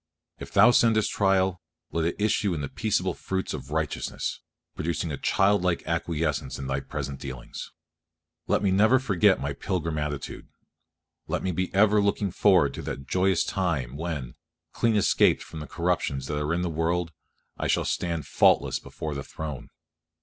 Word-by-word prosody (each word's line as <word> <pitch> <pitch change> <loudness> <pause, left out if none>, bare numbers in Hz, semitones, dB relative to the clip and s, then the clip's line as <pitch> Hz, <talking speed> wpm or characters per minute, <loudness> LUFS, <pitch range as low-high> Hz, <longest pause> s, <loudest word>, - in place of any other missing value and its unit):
If - - -8
Thou 105 +5 +7
sendest 115 -3 +3
trial, 95 -2 +2 0.3
let 85 -1 0
it 85 - 0
issue 105 -3 +1
in 75 - -3
the 70 - -3
peaceable 95 -5 0
fruits 95 +2 -3
of 70 - -7
righteousness, 75 -1 -2 0.3
producing 85 0 -2
a 70 - -3
child 100 0 +2
like 90 -2 0
acquiescence 80 -4 -1
in 70 - -6
Thy 65 0 -1
present 70 -1 -5
dealings. 65 -3 -7 0.8
Let - - +1
me 100 - +3
never 110 +7 +5
forget 100 -10 +3
my 70 +1 -2
pilgrim 80 0 -2
attitude. 75 -2 -5 0.8
Let 90 +3 -2
me 95 - 0
be 90 +2 -2
ever 105 +1 +4
looking 100 -1 0
forward 90 -7 +4
to - - -6
that 70 - -6
joyous 95 +6 +2
time 75 -10 -1
when, 75 -6 -4 0.4
"clean 115 -2 +2
escaped" 105 - +3
from 80 - -9
the 75 - -7
corruptions 85 -6 -1
that 75 +1 -2
are 75 +1 -1
in 90 - -1
the - - 0
world, 80 +1 0 0.5
I - - -1
shall - - +1
stand 85 -3 -2
"faultless - - +3
before 80 -1 -6
the 70 -1 -4
Throne." 75 -4 -7
85 Hz, 170 wpm, -26 LUFS, 75-95 Hz, 0.8 s, Thou